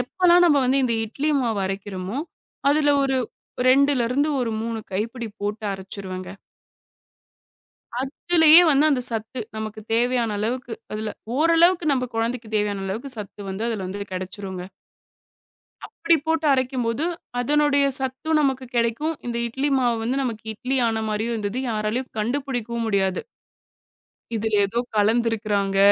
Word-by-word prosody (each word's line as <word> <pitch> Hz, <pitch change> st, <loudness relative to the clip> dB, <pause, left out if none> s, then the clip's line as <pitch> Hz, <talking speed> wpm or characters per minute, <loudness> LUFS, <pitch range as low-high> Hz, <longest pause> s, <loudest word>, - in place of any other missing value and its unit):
எப்போல்லாம் 355 Hz, +7 st, +4 dB
நம்ம 295 Hz, -4 st, +5 dB
வந்து 260 Hz, +2 st, +3 dB
இந்த 235 Hz, -2 st, +1 dB
இட்லி 280 Hz, +8 st, -2 dB
மாவு 225 Hz, -5 st, 0 dB
அரைக்குறமோ, 195 Hz, +3 st, -4 dB, 0.5 s
அதுல 290 Hz, -1 st, +3 dB
ஒரு 270 Hz, -1 st, +1 dB, 0.5 s
2ல 270 Hz, -2 st, +4 dB
இருந்து 285 Hz, +4 st, +1 dB
ஒரு 240 Hz, -2 st, -1 dB
3 230 Hz, 0 st, -3 dB
கைப்பிடி 230 Hz, +4 st, -3 dB
போட்டு 210 Hz, +2 st, -3 dB
அரைச்சுருவேங்க. 190 Hz, -1 st, -7 dB, 1.7 s
அதுலயே 320 Hz, +4 st, +6 dB
வந்து 290 Hz, +1 st, +4 dB
அந்தச் 255 Hz, -4 st, +2 dB
சத்து 225 Hz, +3 st, -4 dB, 0.2 s
நமக்குத் 215 Hz, 0 st, -6 dB
தேவையான 240 Hz, -2 st, +1 dB
அளவுக்கு, 240 Hz, +2 st, -2 dB, 0.2 s
அதுல 215 Hz, 0 st, -3 dB, 0.2 s
ஓரளவுக்கு 335 Hz, 0 st, +4 dB
நம்ம 255 Hz, -2 st, 0 dB
குழந்தைக்குத் 225 Hz, -1 st, -2 dB
தேவையான 205 Hz, -2 st, -1 dB
அளவுக்குச் 230 Hz, +6 st, -4 dB
சத்து 205 Hz, -1 st, -8 dB
வந்து 195 Hz, +4 st, -3 dB
அதுல 195 Hz, -5 st, -3 dB
இது 200 Hz, -, -5 dB
கிடைச்சுருங்க. 185 Hz, 0 st, -6 dB, 1.2 s
அப்டி 335 Hz, 0 st, +2 dB
போட்டு 320 Hz, -1 st, 0 dB
அரைக்கும்போது, 255 Hz, +1 st, 0 dB, 0.3 s
அதனுடைய 285 Hz, +2 st, +3 dB
சத்தும் 265 Hz, +4 st, -1 dB
நமக்குக் 260 Hz, -3 st, -1 dB
கிடைக்கும். 235 Hz, +8 st, 0 dB
இந்த 235 Hz, -1 st, -2 dB
இட்லி 270 Hz, +5 st, -1 dB
மாவு 240 Hz, -2 st, +1 dB
வந்து 260 Hz, +4 st, 0 dB
நமக்கு 225 Hz, -4 st, -4 dB
இட்லி 255 Hz, +5 st, -2 dB
ஆன 220 Hz, 0 st, -1 dB
மாரியும் 220 Hz, +3 st, -1 dB
இருந்தது. 210 Hz, +3 st, -3 dB
யாராலையும் 215 Hz, +4 st, -2 dB
கண்டுபிடிக்கவும் 240 Hz, -1 st, -2 dB
முடியாது. 190 Hz, -2 st, +1 dB, 1.1 s
இதுல 220 Hz, 0 st, -2 dB
ஏதோ 200 Hz, +4 st, -2 dB, 0.2 s
கலந்துருக்கிறாங்க. 210 Hz, -2 st, +1 dB
235 Hz, 130 wpm, -23 LUFS, 215-275 Hz, 1.7 s, அதுலயே